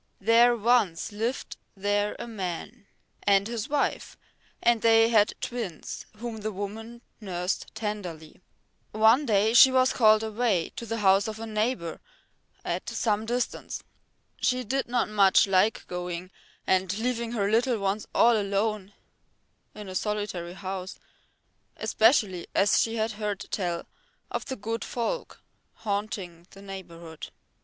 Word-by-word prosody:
There 235 +3 +5
once 220 -6 +2
lived 225 +5 -3 0.2
there 205 +1 0
a - - -6
man 200 +1 -6 0.3
and 200 0 +3
his 235 +3 -4
wife, 290 -1 -1 0.4
and 235 -2 +3
they 225 0 +5
had 215 -3 +3
twins 225 -10 -5
whom 230 0 -5
the 215 0 -4
woman 220 +4 -7 0.2
nursed 180 -3 -3
tenderly. 185 -8 -6 0.5
One 225 +6 +4
day 215 0 +3
she 260 +2 +9
was 260 0 +3
called 215 -2 +5
away 220 -5 0
to 235 - -6
the 225 0 -3
house 195 +2 +5
of 215 -1 -5
a 225 - -5
neighbour 215 -5 -2 0.7
at - - -3
some 215 -1 -1
distance. 245 +1 -3 0.5
She 250 +1 0
did 265 +4 -1
not 245 0 +1
much 200 -2 +5
like 195 +2 +2
going 180 0 -5 0.3
and 190 +1 +1
leaving 235 0 -2
her 200 -4 0
little 235 +2 +2
ones 200 +1 -2
all 235 0 +6
alone 205 0 -1 0.8
in 210 -1 -8
a 185 - -7
solitary 200 -3 -3
house, 190 -1 -6 0.8
especially 215 -6 +2
as 200 - +4
she 225 0 -1
had 220 0 0
heard 210 -2 -3
tell 175 -4 -2 0.5
of - - -3
the 265 - -4
good 225 +1 -4
folk 245 - -4 0.3
haunting 200 -5 -4
the 195 - -14
neighbourhood. 170 -4 -9
210 Hz, 135 wpm, -27 LUFS, 195-230 Hz, 0.8 s, she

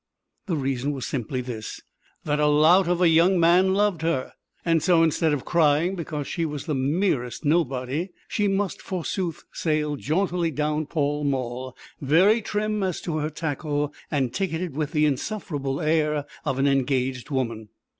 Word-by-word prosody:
The 175 - 0
reason 135 0 -1
was 135 -3 -4
simply 130 0 -3
this, 120 -4 -6 0.4
that 150 0 0
a 150 - +3
lout 160 +5 +5
of 180 +1 +1
a - - +6
young 170 +3 +4
man 180 +3 +4
loved 205 -5 +1
her. 160 -6 -1 0.3
And 165 -2 +3
so, 170 0 +4
instead 160 0 +2
of 145 -3 -2
crying 160 +1 +3
because 155 -4 -4
she 170 - -2
was 150 -3 -4
the 155 - -1
merest 140 -1 0
nobody, 145 +1 0 0.2
she 210 -1 0
must, 195 -1 -1
forsooth, 180 -1 -3
sail 150 -2 -1
jauntily 175 +3 0
down 150 0 -1
Pall 145 -1 -1
Mall, 130 -2 -3 0.2
very 185 - +4
trim 210 0 -1
as 185 -3 -1
to 160 -3 -3
her 155 0 -1
tackle 150 -1 -2 0.2
and 135 -5 0
ticketed 180 -4 -2
with 150 -1 -2
the 150 -2 +2
insufferable 145 -3 -2
air 150 -2 +1 0.2
of 135 -3 -1
an 135 - +2
engaged 130 -1 0
woman. 115 -6 -2
150 Hz, 165 wpm, -25 LUFS, 140-175 Hz, 0.4 s, a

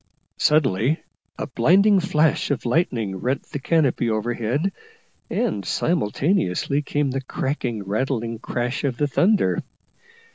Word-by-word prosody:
Suddenly 145 - +2 0.4
a - - -3
blinding 190 - +4
flash 160 -3 +1
of 140 -3 -2
lightning 120 - 0
rent 130 +8 -1
the 145 - -3
canopy 140 -6 +1
overhead, 120 - -1 0.6
and 215 - -1
simultaneously 145 - 0
came 145 -1 -1
the 135 +1 -2
cracking, 130 -5 -3
rattling 115 +2 -2
crash 120 +4 -3
of 130 -4 -1
the 145 - +1
thunder. 190 +9 +2
135 Hz, 115 wpm, -23 LUFS, 115-160 Hz, 0.6 s, blinding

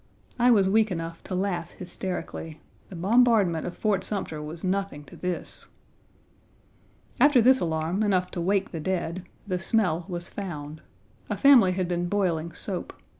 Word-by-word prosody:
I 245 +1 +5
was 200 -5 +5
weak 215 +2 +3
enough 165 -2 -5
to 185 - -4
laugh 180 -3 -2
hysterically. 175 -3 -6 0.3
The 190 - -9
bombardment 200 -3 +3
of 175 - -7
Fort 205 -4 +1
Sumter 175 -7 -2
was 155 +2 -7
nothing 190 -5 -2
to - - -14
this. 180 -1 -5 1.5
After 290 -3 +6
this 260 +3 +5
alarm, 165 +3 -1
enough 185 -3 +1
to 175 - -4
wake 195 +2 0
the 165 - -5
dead, 175 +1 -2 0.2
the 185 -3 -2
smell 180 -6 +1
was 175 -2 -5
found. 155 -6 -7 0.5
A - - -2
family 245 -10 +6
had 185 -1 -1
been 175 0 -1
boiling 170 -5 0
soap. 180 +2 -4
185 Hz, 155 wpm, -26 LUFS, 170-200 Hz, 1.5 s, After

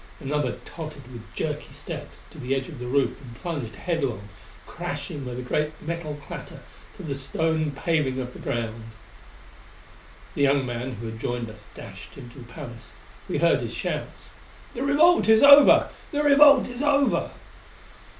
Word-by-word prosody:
Another 145 -3 -1
tottered 155 -5 -8
with 120 -2 -8
jerky 150 -3 -3
steps 145 +1 -8
to 155 - -13
the 135 0 -1
edge 135 -1 -3
of 150 -7 -10
the 125 - -5
roof 140 +2 0
and 120 -4 -11
plunged 145 - -5
headlong, 135 - -2 0.4
crashing 145 - -5
with 125 -1 -5
a 125 - -5
great 150 +4 -2
metal 160 -2 -5
clatter - - -9 0.4
to - - -9
the 145 - -3
stone 155 +3 -1
paving 140 -2 0
of 125 -1 -5
the - - -11
ground.... 115 -1 -3 1.5
The - - -3
young 140 -1 +3
man 125 +1 -4
who 115 0 -7
had 110 0 -6
joined 120 -1 -3
us 105 -1 -16
dashed - - -11
into 125 -1 -11
the 120 - -10
palace. 120 -4 -10 0.4
We - - -1
heard - - +3
his - - -5
shouts: - - -5 0.4
"The 240 - -5
revolt 290 +1 +4
is 220 +2 +6
over! 280 0 +8 0.2
The 295 -1 0
revolt 285 -1 +7
is 245 +1 -6
over!" 285 -2 +2
145 Hz, 165 wpm, -25 LUFS, 125-170 Hz, 1.5 s, over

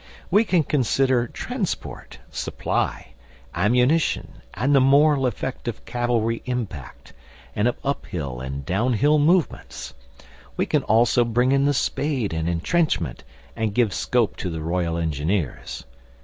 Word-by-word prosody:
We 215 +3 +5
can 180 -6 +2
consider 130 -3 +1
transport, - - -5
supply, - - -2 0.4
ammunition, 125 - +1
and 125 +8 +1
the 140 - +6
moral 140 0 +4
effect 125 +2 -4
of 120 - -5
cavalry 120 -2 0
impact, 110 - -5 0.4
and 105 +3 +2
of 125 - 0
uphill 80 - -3
and 70 +1 -5
downhill 125 - +2
movements. 170 +3 0 0.6
We - - +1
can - - +1
also 115 +2 +3
bring 120 +2 +1
in 140 0 +3
the 145 - +3
spade 130 - -1
and 80 +1 -1
entrenchment, 85 - 0 0.3
and 110 -2 -2
give 115 -6 +2
scope 120 -4 0
to 90 - -3
the 80 -2 -4
Royal 85 0 -1
Engineers. 80 +1 -2
120 Hz, 130 wpm, -23 LUFS, 90-135 Hz, 0.6 s, the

